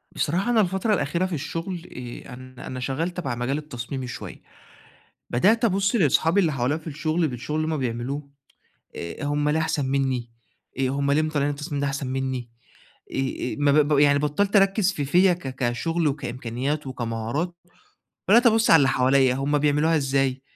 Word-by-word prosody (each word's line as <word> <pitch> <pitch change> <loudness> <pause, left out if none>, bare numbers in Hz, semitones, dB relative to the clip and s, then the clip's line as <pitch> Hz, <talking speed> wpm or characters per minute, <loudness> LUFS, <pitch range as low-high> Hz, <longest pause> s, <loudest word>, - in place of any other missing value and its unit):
بصراحة 180 +10 0
أنا 225 -2 +4
الفترة 190 +3 0
الأخيرة 170 +1 0
في 185 - -4
الشغل 165 +4 -5 0.4
آآ - - -9
أنا 130 0 -11
أنا 130 - -5
شغال 135 +7 -2
تبع 150 -9 -3
مجال 125 +4 -1
التصميمي 130 -3 -6
شوية، 120 - -8 0.9
بدأت 220 - +3
أبُص 200 +1 +1
لأصحابي 165 - +3
اللي 170 -5 +2
حواليّا 130 +4 0
في 160 - -11
الشغل 155 +2 -1
للشغل 135 +2 -3
اللي 160 0 -1
هُم - - -2
بيعملوه 130 +4 -3 0.7
آآ 85 +9 -6
هُم 145 +1 0
ليه 155 +2 +2
أحسن 160 -3 0
منّي 130 -3 -1 0.5
آآ 135 - +2
هُم 140 +1 0
ليه 145 +2 +3
مطلعين 150 -2 0
التصميم 145 0 -4
ده 145 - +1
أحسن 140 0 -3
منّي، 130 -2 -3 0.6
آآ - - -6
آآ 135 -1 -2
مب 145 0 +4
يعني 145 -1 +5
بطّلت 150 +8 0
أركّز 195 0 +4
في 150 -7 -3
فيّا 180 +6 +4
ك 135 -7 -7
كشغل 145 +7 0
وكإمكانيات 135 +1 -3
وكمهارات، 125 +7 -3 0.7
وبدأت 235 +4 +7
أبُص 225 0 +3
على 165 - +9
اللي 135 -3 +3
حواليّا 130 0 +3
هُم 140 +2 0
بيعملوها 150 +3 +2
إزاي، 135 -2 0
145 Hz, 170 wpm, -24 LUFS, 130-165 Hz, 0.9 s, على